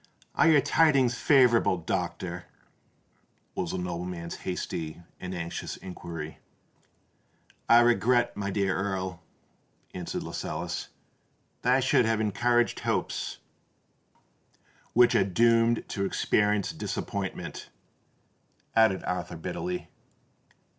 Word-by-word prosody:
"Are - - +4
your 150 -3 +6
tidings 140 -7 +3
favourable, 125 -8 +4
doctor?" 85 - -3 1.1
was 90 - -3
the - - -3
nobleman's 90 -1 -4
hasty 85 -3 -4 0.2
and 90 0 -5
anxious 85 -1 -5
inquiry. 85 -4 -7 1.3
"I 115 +1 +8
regret, 120 0 +3
my 100 -1 -3
dear 95 -1 0
Earl," 95 -2 -3 0.7
answered 90 -2 -4
Lascelles, - - -4 0.7
"that 125 +1 +3
I 135 - +3
should 130 -1 +3
have 110 -1 +1
encouraged 120 +3 +1
hopes——" - - -2 1.6
"Which 120 0 +6
are - - +4
doomed 115 +4 +3
to 100 - -2
experience 105 +1 +1
disappointment," - - -5 1.1
added 110 -4 +4
Arthur 90 -2 -3
bitterly. 180 - -4
105 Hz, 100 wpm, -28 LUFS, 90-120 Hz, 1.6 s, I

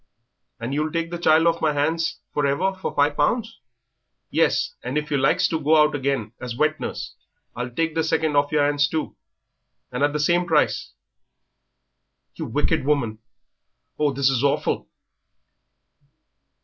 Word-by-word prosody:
"And 120 +3 -4
you'll 155 +2 -1
take 165 +1 -2
the 175 - -4
child 160 -1 +4
off 170 0 +2
my 155 -1 +2
hands 160 +3 -1
for 145 -1 +1
ever 185 +8 +1
for 190 0 -5
five 145 +1 +2
pounds?" 225 +10 0 0.7
"Yes; - - +1
and 125 +4 -3
if 150 0 -3
you 145 - +2
likes 165 +7 +3
to 160 - -1
go 155 +1 +3
out 150 0 +4
again 135 -6 -2
as 125 -2 -5
wet 155 +3 +1
nurse, - - -5 0.4
I'll 125 +1 -3
take 160 +6 -1
the 160 - 0
second 160 -1 0
off 145 +1 +2
yer 145 -2 +3
'ands 145 0 +2
too, 160 0 -3 0.8
and 125 +1 -4
at 145 0 +3
the 150 - -2
same 175 +4 +2
price." 160 - +1 1.4
"You - - -5
wicked - - 0
woman; 130 -7 0 0.8
oh, 150 -1 +2
this 135 0 +2
is 130 0 0
awful!" 140 - 0
150 Hz, 160 wpm, -23 LUFS, 140-160 Hz, 1.4 s, child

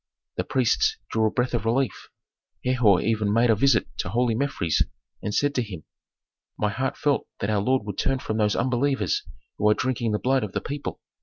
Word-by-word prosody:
The 90 - 0
priests 130 +2 +1
drew 110 0 +2
a - - +2
breath 125 +3 -1
of 120 -4 0
relief. 120 +3 -1 0.6
Herhor 120 -7 +4
even 110 -2 +1
made 115 +2 +4
a - - +4
visit 120 +1 +3
to - - -2
holy 120 +3 +1
Mefres 110 - 0 0.4
and 105 - -3
said 145 +6 +1
to 130 - +1
him, 95 -9 -7 0.7
"My 105 - +1
heart 130 +6 -2
felt 145 -2 +1
that 100 - -1
our 105 -2 +2
lord 130 +1 +1
would 105 -2 -5
turn 135 0 +1
from 110 -4 -3
those 105 -1 +2
unbelievers 125 -3 +1 0.4
who 105 - +4
are 105 - +4
drinking 120 -2 -1
the - - +2
blood 130 +2 +1
of 105 -2 -5
the - - 0
people. 145 0 -5
115 Hz, 205 wpm, -25 LUFS, 105-130 Hz, 0.7 s, Herhor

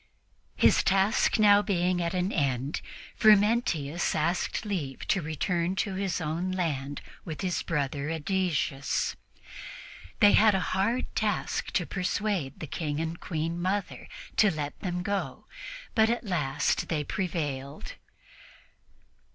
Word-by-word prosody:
His - - +5
task 195 +3 +3
being 205 -4 +4
now 175 - 0
at 170 +2 -2
an 180 +2 0
end, 140 - -1 0.3
Frumentius 205 - +3
asked 175 +5 0
leave 155 -11 -4
to 195 - +2
return 170 +3 -1
to 195 0 -1
his 190 -2 -1
own 165 +3 -2
land 145 -6 -2 0.2
with 160 -3 -6
his 180 -3 -1
brother 145 -2 -2
Ædesius. 160 -4 -1 1.0
They 205 - +7
had 215 -2 +5
a - - +2
hard 215 +7 0
task 210 -3 -1
to 175 - +1
persuade 190 -6 -2
the - - -4
King 150 +1 -3
and 165 0 -2
the 170 - -13
Queen 165 +1 -3
Mother 195 +3 -2 0.3
to 210 - +6
let 150 -4 -4
them 180 -1 -3
go, 200 +1 -3 0.5
but 220 -1 +4
at 235 +1 0
last 150 - 0
they 155 -3 0
prevailed. 145 -7 -4
175 Hz, 130 wpm, -28 LUFS, 150-195 Hz, 1.0 s, They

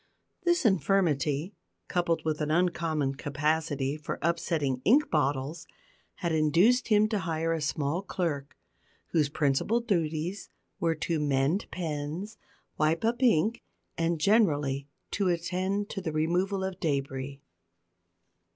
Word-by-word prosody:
This 345 -4 +2
infirmity, 165 -3 +2 0.3
coupled 175 -2 0
with 155 -1 -1
an 150 - -1
uncommon 160 -4 +1
capacity 145 0 -1
for 150 - -5
upsetting 155 -5 0
ink 280 +8 +4
bottles, 145 +1 -1 0.5
had 170 -3 -2
induced 170 +11 +3
him 215 -1 +4
to 215 -2 0
hire 165 -2 -1
a 165 - -2
small 150 +3 -1
clerk, 165 -8 -3 0.5
whose 150 -4 +2
principal 150 - +1
duties 175 -4 -2 0.3
were 165 -1 +1
to 160 +1 -1
mend 145 +5 +1
pens, 165 +5 -4 0.4
wipe 160 +6 +2
up 235 +2 0
ink, 230 -1 +3 0.3
and, 165 0 0
generally, 145 -9 +2 0.2
to 200 -2 0
attend 185 +4 -1
to 195 - -4
the 160 - -3
removal 180 +5 0
of 190 -1 -4
debris. 140 -2 -2
165 Hz, 125 wpm, -29 LUFS, 150-190 Hz, 0.5 s, ink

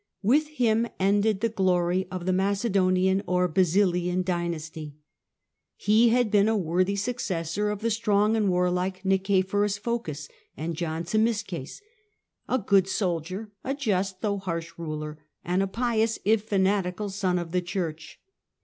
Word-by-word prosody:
With 290 +9 +3
him 235 -6 +1
ended 200 +1 +2
the 230 - +3
glory 185 -3 +1
of 180 -2 -5
the 185 - +1
Macedonian 190 -1 +2
or 180 0 +2
Basilian 180 +1 +2
dynasty. 160 -4 -4 0.8
He 220 +3 +4
had 240 -2 +2
been 205 -1 +4
a 225 - +2
worthy 185 +2 +1
successor 200 -4 -2
of 210 0 -4
the 230 +1 0
strong 210 -1 +2
and 210 -3 +2
warlike 180 +1 0
Nicephorus 195 +1 +1
Phocas 200 -10 -4 0.3
and 165 +2 -3
John 160 0 -3
Zimisces, 205 - -1 0.7
a 255 - +2
good 195 -4 +3
soldier, 185 +2 -2
a 270 +2 -2
just, 195 -8 -1
though 200 -2 -1
harsh, 170 -3 -4
ruler, 155 -2 -5 0.3
and 180 +2 +1
a 195 - +1
pious, 225 +1 0
if 215 0 +3
fanatical, 195 -1 0
son 190 -2 0
of 170 -2 -4
the 180 0 +1
Church. 175 -3 -5
190 Hz, 140 wpm, -26 LUFS, 180-210 Hz, 0.8 s, He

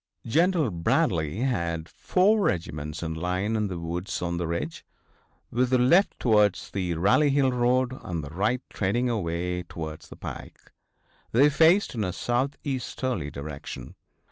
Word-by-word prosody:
General 160 - +2
Bradley 85 +1 0
had 85 -10 -1
four 205 - +2
regiments 75 - -2
in 80 -1 -2
line 90 +6 -1
in 105 -1 0
the 90 -3 -5
woods 85 +3 -4
on 85 -1 -2
the 85 -1 -2
ridge, 85 -1 -3 0.7
with 125 +1 +1
the 130 - +4
left 170 +11 +4
towards 105 -5 +2
the 90 -3 -2
Rally 105 - +4
Hill 135 -1 +3
road 125 +1 +1
and 85 -3 -4
the 70 - -8
right 110 +8 0
trending 120 +5 0
away 90 -3 -2
towards 80 -2 -7
the - - -10
pike. - - -9 0.6
They 140 +5 +5
faced 165 +7 +4
in 110 -3 -2
a 90 -2 -2
southeasterly 130 - -2
direction. 70 -1 -7
100 Hz, 145 wpm, -26 LUFS, 85-130 Hz, 0.7 s, They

